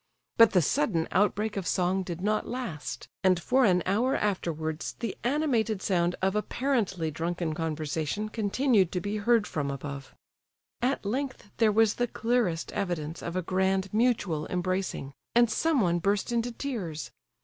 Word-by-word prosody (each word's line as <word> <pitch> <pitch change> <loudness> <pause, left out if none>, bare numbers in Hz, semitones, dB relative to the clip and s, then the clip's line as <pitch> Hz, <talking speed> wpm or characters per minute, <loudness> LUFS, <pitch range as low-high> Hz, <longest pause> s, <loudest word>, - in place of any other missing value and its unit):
But 230 -1 +7
the 180 -3 +4
sudden 170 - +1
outbreak 210 +2 +1
of 190 -3 -3
song 185 +1 +1
did 175 -2 -5
not 215 +2 0
last; 235 - -5 0.2
and 185 -2 +4
for 255 +9 +3
an 180 -4 +3
hour 235 +8 +2
afterwards 160 -6 -2
the 230 -5 -3
animated 240 -6 +1
sound 180 -2 +1
of 190 +1 +2
apparently 210 - 0
drunken 165 +1 -2
conversation 160 +4 -2
continued 215 -2 +2
to 180 - 0
be 205 +4 -3
heard 225 +1 +3
from 145 -7 -2
above. 140 0 -6 0.7
At 255 -2 0
length 260 -1 -3
there 225 -2 +4
was 220 0 +4
the 245 - 0
clearest 225 -8 0
evidence 170 -5 -3
of 170 - -5
a 185 - 0
grand 190 +2 0
mutual 215 -9 +1
embracing, 180 -6 -2 0.2
and 240 -1 +5
someone 215 - +2
burst 200 +6 0
into 235 +1 0
tears. 215 - -4
195 Hz, 150 wpm, -28 LUFS, 170-230 Hz, 0.7 s, But